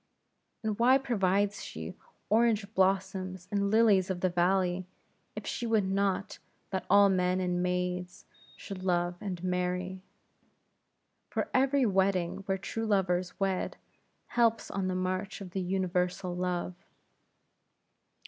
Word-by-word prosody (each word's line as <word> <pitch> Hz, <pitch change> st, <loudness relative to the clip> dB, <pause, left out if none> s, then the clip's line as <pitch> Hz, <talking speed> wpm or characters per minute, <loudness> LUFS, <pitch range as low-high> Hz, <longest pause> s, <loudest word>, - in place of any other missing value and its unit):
And 215 Hz, -1 st, -2 dB
why 255 Hz, +3 st, +6 dB
provides 205 Hz, -6 st, 0 dB
she 80 Hz, 0 st, -7 dB, 0.3 s
orange 220 Hz, -1 st, +2 dB
blossoms 190 Hz, -1 st, 0 dB
and 200 Hz, -1 st, +1 dB
lilies 210 Hz, -4 st, +4 dB
of 180 Hz, -2 st, -2 dB
the 185 Hz, -, +2 dB
valley, 180 Hz, +1 st, +1 dB, 0.5 s
if -, -, -6 dB
she 240 Hz, -, -3 dB
would 220 Hz, -3 st, +2 dB
not 195 Hz, 0 st, -1 dB, 0.3 s
that 190 Hz, -1 st, -3 dB
all 200 Hz, +1 st, +7 dB
men 185 Hz, -1 st, +2 dB
and 180 Hz, -1 st, 0 dB
maids 180 Hz, 0 st, -2 dB, 0.3 s
should 195 Hz, -2 st, -7 dB
love 175 Hz, -1 st, +1 dB
and 185 Hz, -4 st, -5 dB
marry? 180 Hz, +1 st, -2 dB, 1.3 s
For -, -, -2 dB
every 270 Hz, +1 st, +3 dB
wedding 190 Hz, -4 st, +1 dB
where 190 Hz, -1 st, +1 dB
true 225 Hz, +5 st, -4 dB
lovers 185 Hz, -3 st, 0 dB
wed, 195 Hz, -2 st, -1 dB, 0.5 s
helps 230 Hz, -2 st, +2 dB
on 195 Hz, -1 st, -1 dB
the 185 Hz, -, -1 dB
march 185 Hz, +3 st, -2 dB
of 185 Hz, -2 st, -10 dB
universal 180 Hz, -1 st, -1 dB
Love. 180 Hz, 0 st, -2 dB
190 Hz, 125 wpm, -30 LUFS, 180-200 Hz, 1.3 s, all